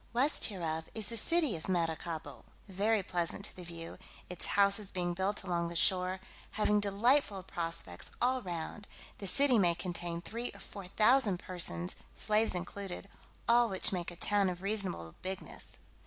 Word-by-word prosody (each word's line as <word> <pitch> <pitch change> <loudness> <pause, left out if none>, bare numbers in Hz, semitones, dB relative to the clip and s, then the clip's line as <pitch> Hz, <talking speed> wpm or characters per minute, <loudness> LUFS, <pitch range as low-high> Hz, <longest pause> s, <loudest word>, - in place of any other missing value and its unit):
West 265 +5 +4
hereof 160 -5 -2
is 220 -2 0
the 230 - -3
city 310 - +2
of 160 +3 -7
Maracaibo, 165 -2 -2 0.2
very 205 +2 +1
pleasant 180 +2 -2
to - - -9
the 180 - -8
view, 165 -1 -8 0.3
its 180 -1 -3
houses 200 0 +3
being 175 -1 -1
built 190 +4 -1
along 170 -2 0
the 170 - -7
shore, 185 +2 +3 0.3
having 210 0 +3
delightful 205 +1 +2
prospects 165 - -4
all 255 +1 +2
round: 180 +2 -5 0.3
the 200 - -4
city 260 +3 +6
may 175 -3 +4
contain 175 -1 -3
three 230 +7 -4
or - - -12
four 200 -1 -9
thousand 215 0 +4
persons, 90 - -3 0.2
slaves 215 -1 +2
included, 190 +1 -5 0.4
all 235 0 +5
which 190 0 +3
make 175 -2 -2
a 175 - -8
town 200 +2 +2
of 180 +1 -6
reasonable 195 - -2
bigness. 190 +1 -6
190 Hz, 160 wpm, -33 LUFS, 175-210 Hz, 0.4 s, city